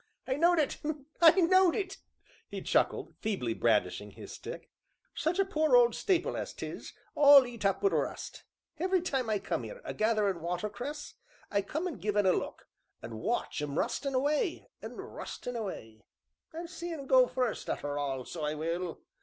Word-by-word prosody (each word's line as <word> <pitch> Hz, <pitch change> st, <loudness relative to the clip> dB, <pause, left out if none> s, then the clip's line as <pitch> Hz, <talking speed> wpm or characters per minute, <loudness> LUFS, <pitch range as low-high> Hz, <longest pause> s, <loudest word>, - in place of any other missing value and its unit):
"I 260 Hz, -, 0 dB
knowed 340 Hz, +5 st, +4 dB
it 300 Hz, -3 st, +1 dB, 0.4 s
I 330 Hz, -1 st, +10 dB
knowed 370 Hz, 0 st, +5 dB
it," 385 Hz, -2 st, -3 dB, 0.5 s
he -, -, -6 dB
chuckled, -, -, +1 dB
feebly 190 Hz, -, -1 dB
brandishing 105 Hz, -3 st, +1 dB
his -, -, -11 dB
stick, -, -, -8 dB, 0.4 s
"such 330 Hz, +3 st, -1 dB
a 390 Hz, -, +3 dB
poor 310 Hz, -7 st, +2 dB
old 240 Hz, -1 st, +7 dB
stapil 365 Hz, -, +1 dB
as -, -, -5 dB
'tis, -, -, -7 dB, 0.2 s
all 285 Hz, -2 st, +8 dB
eat 235 Hz, -3 st, -8 dB
up 195 Hz, -1 st, +1 dB
wi' 200 Hz, -, +5 dB
rust. 155 Hz, -6 st, -3 dB, 0.4 s
Every 370 Hz, +2 st, +2 dB
time 265 Hz, -9 st, -1 dB
I 215 Hz, -, +2 dB
come -, -, -3 dB
'ere -, -, -8 dB
a -, -, -4 dB
gatherin' 210 Hz, -5 st, +1 dB
watercress, 210 Hz, -, -4 dB, 0.4 s
I 200 Hz, -, +2 dB
come 310 Hz, -, -3 dB
in 355 Hz, -, -3 dB
an' 220 Hz, -, -11 dB
give 210 Hz, +3 st, -1 dB
un 205 Hz, -, +4 dB
a 185 Hz, -, +5 dB
look, -, -, -4 dB, 0.4 s
an' 115 Hz, -1 st, -6 dB
watch 220 Hz, -5 st, -1 dB
un 145 Hz, -1 st, -3 dB
rustin' 275 Hz, -, -1 dB
away, 295 Hz, +6 st, 0 dB
an' -, -, -7 dB
rustin' 245 Hz, -, -7 dB
away; 115 Hz, -, -6 dB, 0.5 s
I'll 335 Hz, +1 st, -6 dB
see 345 Hz, 0 st, -6 dB
un 295 Hz, -4 st, -5 dB
go 260 Hz, -1 st, +6 dB
fust, 250 Hz, -3 st, -2 dB
arter 145 Hz, 0 st, -2 dB
all, 135 Hz, -3 st, -2 dB
so 160 Hz, -, -6 dB
I 150 Hz, +1 st, -1 dB
will!" 165 Hz, +2 st, -3 dB
235 Hz, 180 wpm, -31 LUFS, -, 0.5 s, I